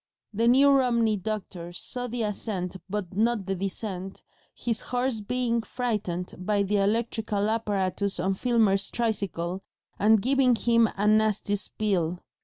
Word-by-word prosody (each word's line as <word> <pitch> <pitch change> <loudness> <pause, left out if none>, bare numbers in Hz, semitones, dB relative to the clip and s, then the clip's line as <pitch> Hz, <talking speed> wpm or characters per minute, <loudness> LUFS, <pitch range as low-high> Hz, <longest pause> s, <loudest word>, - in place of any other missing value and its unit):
The 230 +3 +1
New 275 +4 +6
Romney 235 -5 +3
doctor 190 -4 -5
saw 245 +7 -4
the 240 -1 -2
ascent 195 -3 -3
but 195 -3 -4
not 220 -1 +1
the 195 - -1
descent, 195 0 -4 0.3
his 230 -2 -1
horse 245 -2 -1
being 235 +1 0
frightened 210 -8 -3
by 200 +2 +1
the 205 +1 0
electrical 215 0 0
apparatus 200 -3 -1
on 190 +2 +1
Filmer's 205 -3 +2
tricycle 195 -6 -2 0.4
and 215 +1 +5
giving 255 +2 +3
him 230 -1 +3
a 205 - 0
nasty 215 -1 +2
spill. 190 -4 -1
210 Hz, 135 wpm, -27 LUFS, 195-235 Hz, 0.4 s, New